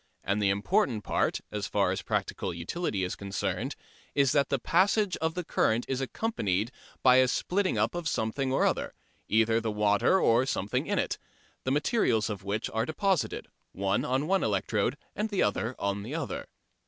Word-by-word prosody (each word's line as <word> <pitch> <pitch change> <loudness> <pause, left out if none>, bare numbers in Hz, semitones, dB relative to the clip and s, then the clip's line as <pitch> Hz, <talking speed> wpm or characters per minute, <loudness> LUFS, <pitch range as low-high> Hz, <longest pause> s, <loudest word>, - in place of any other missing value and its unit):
And 100 +2 0
the 100 - +3
important 110 - +1
point, - - 0
as - - -3
far - - +1
as - - -2
practical 90 -3 -2
utility 95 - -2
is 90 - -2
concerned, 100 0 -3 0.4
is 140 -2 +4
that 140 -1 +2
the 140 - +2
passage 190 - +2
of 160 0 -1
the 180 - -2
current 115 -6 +1
is 135 0 -1
accompanied 115 - -1 0.3
by 130 -1 +7
a 130 0 +6
splitting 185 +8 0
up - - +1
of 175 -2 -3
something 130 0 -1
or 135 - +3
other, - - -1 0.3
either 110 +1 +3
the 115 - -2
water 105 - +3
or 120 -1 +3
something 100 -6 -1
in - - 0
it, - - -1 0.5
the 130 - +1
materials 135 - +2
of 100 -2 -6
which 100 +3 -2
are 110 0 0
deposited, 190 +1 0 0.3
one 100 +1 0
on 130 +3 0
one 195 +3 +2
electrode - - 0 0.2
and 215 +1 -1
the 200 - +1
other 110 +4 -1
on 100 0 -1
the 120 +9 -5
other. 165 - -4
125 Hz, 180 wpm, -29 LUFS, 105-165 Hz, 0.5 s, by